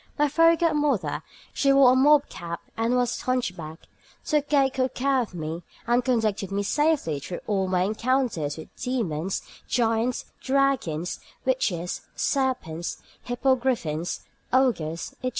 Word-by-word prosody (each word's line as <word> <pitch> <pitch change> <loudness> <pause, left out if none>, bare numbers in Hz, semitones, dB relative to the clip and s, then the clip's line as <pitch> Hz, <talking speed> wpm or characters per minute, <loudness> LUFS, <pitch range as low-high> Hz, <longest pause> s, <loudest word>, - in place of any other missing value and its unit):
My 295 - +3
fairy 330 +3 +5
godmother 300 - +1 0.3
(she 275 - +3
wore 275 -2 +7
a - - +4
mob 290 +2 +5
cap 170 0 -6 0.2
and 230 +2 +1
was 245 -1 0
hunchbacked) 180 -11 -3 0.4
took 300 -2 +1
good 270 -3 +2
care 270 0 +2
of 215 -6 -6
me, 160 +1 -4 0.2
and 240 +1 +2
conducted 220 -6 0
me 200 +1 0
safely 290 - +1
through 175 +5 -6
all 195 -3 0
my 180 -1 +2
encounters 220 - 0
with 160 - -11
demons, 195 - -2 0.2
giants, 230 +1 +1 0.2
dragons, 265 - 0 0.3
witches, 180 -10 0
serpents, 255 - -1 0.3
hippogriffins, 245 - 0 0.3
ogres, 190 -12 +1
etc. 255 - 0
245 Hz, 130 wpm, -26 LUFS, 180-265 Hz, 0.4 s, wore